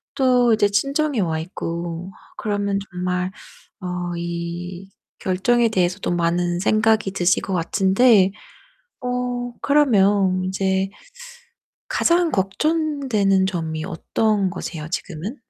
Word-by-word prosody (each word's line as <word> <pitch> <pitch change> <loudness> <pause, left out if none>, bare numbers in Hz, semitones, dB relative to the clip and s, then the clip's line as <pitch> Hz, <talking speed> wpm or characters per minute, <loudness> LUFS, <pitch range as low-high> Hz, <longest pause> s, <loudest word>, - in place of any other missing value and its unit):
또 250 -3 +4
이제 215 -1 +3
친정에 275 +5 0
와 160 -3 -1
있고 170 +1 -5 0.3
그러면 205 -2 -1
정말 180 +1 -2 0.5
어 180 -1 -3
이 170 +2 -5 0.3
결정에 230 +6 +2
대해서도 185 -1 0
많은 175 0 0
생각이 215 0 +2
드실 180 -1 +2
것 195 - -3
같은데 195 +4 +4 0.7
어 245 -1 -2
그러면 200 -10 +3
인제 190 0 0 1.0
가장 340 0 +2
걱정되는 220 - +1
점이 160 -4 -3
어떤 195 +2 0
거세요, 155 -2 -6
지금은? 185 - -5
195 Hz, 215 characters per minute, -22 LUFS, 175-230 Hz, 1.0 s, 또